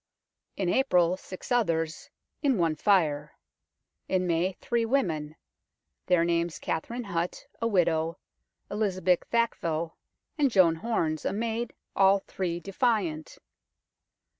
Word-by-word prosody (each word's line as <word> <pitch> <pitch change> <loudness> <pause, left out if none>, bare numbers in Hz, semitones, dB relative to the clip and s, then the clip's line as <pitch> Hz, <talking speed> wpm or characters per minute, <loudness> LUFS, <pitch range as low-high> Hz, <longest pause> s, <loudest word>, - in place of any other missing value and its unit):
In 190 - -1
April 180 -5 +3
six 185 +4 -10
others, 165 -9 0 0.3
in 275 -6 +2
one 165 -3 +1
fire; 150 -5 +1 0.7
in 185 -1 +1
May 175 +2 +1
three 235 +5 -1
women 165 - 0 0.7
their 180 -2 +4
names 170 -1 0
Katherine 235 +10 -3
Hut, 175 -4 -3 0.2
a 230 - +2
widow, 170 -4 +1 0.5
Elizabeth 185 -4 +1
Thackvel, 170 -9 0 0.4
and 285 -2 +4
Joan 180 -7 +4
Horns, 160 -7 -1
a - - -1
maid, 230 +2 -2 0.2
all 195 0 +5
three 180 -3 -3
defiant. 195 - -1
180 Hz, 115 wpm, -28 LUFS, 165-220 Hz, 0.7 s, all